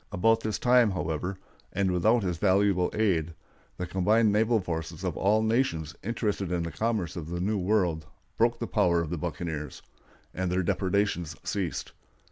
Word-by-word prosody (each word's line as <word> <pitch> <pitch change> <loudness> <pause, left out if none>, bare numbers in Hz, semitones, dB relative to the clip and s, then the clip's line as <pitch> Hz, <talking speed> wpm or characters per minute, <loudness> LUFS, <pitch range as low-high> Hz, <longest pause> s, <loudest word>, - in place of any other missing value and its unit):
About 115 +5 +3
this 110 -1 -2
time, 125 -2 +4
however, 90 0 -3 0.3
and 95 -2 0
without 110 +6 +3
his 90 -3 -2
valuable 95 -2 +3
aid, 85 -7 +1 0.4
the 90 - -3
combined 105 +5 +3
naval 110 +2 +3
forces 80 -2 -5
of 90 -4 -2
all 105 +3 +2
the - - 0
nations 80 - 0
interested 105 -4 -2
in 85 -1 0
the 85 - -4
commerce 105 -3 -1
of 80 -3 -6
the 85 0 -3
New 100 +3 0
World 90 -5 +1 0.3
broke 120 +1 +2
the 115 - -3
power 90 -7 +2
of 80 -1 -4
the 85 - -2
buccaneers, 80 -4 -5 0.5
and 90 -1 -2
their 90 +1 +1
depredations 95 -3 0
ceased. 90 -9 -3
95 Hz, 170 wpm, -28 LUFS, 85-105 Hz, 0.5 s, time